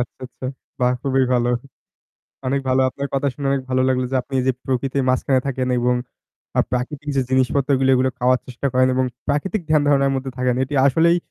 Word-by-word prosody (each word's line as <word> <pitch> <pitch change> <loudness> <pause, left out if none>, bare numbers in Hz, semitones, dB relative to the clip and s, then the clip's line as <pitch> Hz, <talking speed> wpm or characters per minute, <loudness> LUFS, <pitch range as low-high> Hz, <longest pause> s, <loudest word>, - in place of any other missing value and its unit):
আচ্ছা, 120 - -4
আচ্ছা। 125 +1 -13 0.4
বাহ! 125 0 +3
খুবই 135 -1 +2
ভালো। 120 0 +2 1.0
অনেক 135 +1 +1
ভালো 130 +1 +3
আপনার 140 +2 -4
কথা 135 +1 0
শুনে 140 -1 -4
অনেক 135 -1 0
ভালো 130 0 +2
লাগলো 130 -1 +1
যে - - +2
আপনি 135 +1 -4
যে 130 - +4
প্রকৃতির 135 +1 -1
মাঝখানে 130 0 +2
থাকেন 130 -1 -1
এবং 125 +1 +2 0.6
আ - - +7
প্রাকৃতিক 140 +4 -3
যে 135 - +3
জিনিসপত্রগুলো 130 +1 +2
এগুলো 130 +1 +2
খাওয়ার 125 0 +3
চেষ্টা 125 +2 -4
করেন 130 0 +4
এবং 130 0 +2 0.2
প্রাকৃতিক 180 +7 0
ধ্যান 155 -2 +4
ধারণার 140 -1 +3
মধ্যে 130 0 -4
থাকেন। 125 -1 +1
এটি 145 +2 -7
আসলেই 165 +5 +4
130 Hz, 190 wpm, -21 LUFS, 130-140 Hz, 1.0 s, আ